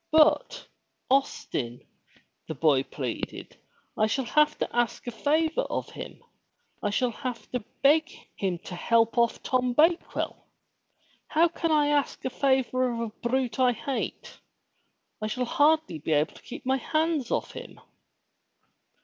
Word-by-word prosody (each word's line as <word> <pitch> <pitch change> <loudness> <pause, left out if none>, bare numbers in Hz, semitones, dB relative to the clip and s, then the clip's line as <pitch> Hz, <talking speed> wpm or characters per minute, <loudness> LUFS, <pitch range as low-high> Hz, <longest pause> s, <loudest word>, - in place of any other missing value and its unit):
But, 315 +10 +3 0.5
Austin," 130 - -1 0.6
the 160 - -4
boy 140 -2 +3
pleaded, 130 -3 -5 0.4
"I 215 - +2
shall 260 +4 -1
have 300 +6 +3
to - - -3
ask 240 -2 0
a 240 - -3
favor 315 - +1
of - - -4
him. - - -9 0.6
I 205 - 0
shall 240 +4 +1
have 250 0 -6
to 250 - -1 0.2
beg 310 +3 +5 0.3
him 185 -3 -1
to - - -7
help 230 +5 +2
off 235 0 +1
Tom 250 -1 +1
Bakewell. 330 +6 +1 0.8
How 335 +2 +3
can 330 0 -2
I 295 -1 +4
ask 290 -1 0
a 260 - -1
favor 255 -2 +1
of 235 - -4
a 230 -1 -2 0.2
brute 260 0 0
I 250 -1 +4
hate? 270 +3 -5 0.8
I 215 - -1
shall 250 +4 -2
hardly 295 - +2
be 155 +2 -1
able 150 +2 +2
to - - -15
keep 255 - -9
my 265 +1 +2
hands 310 -1 0
off - - -1
him." - - -10
255 Hz, 150 wpm, -27 LUFS, 225-300 Hz, 0.8 s, beg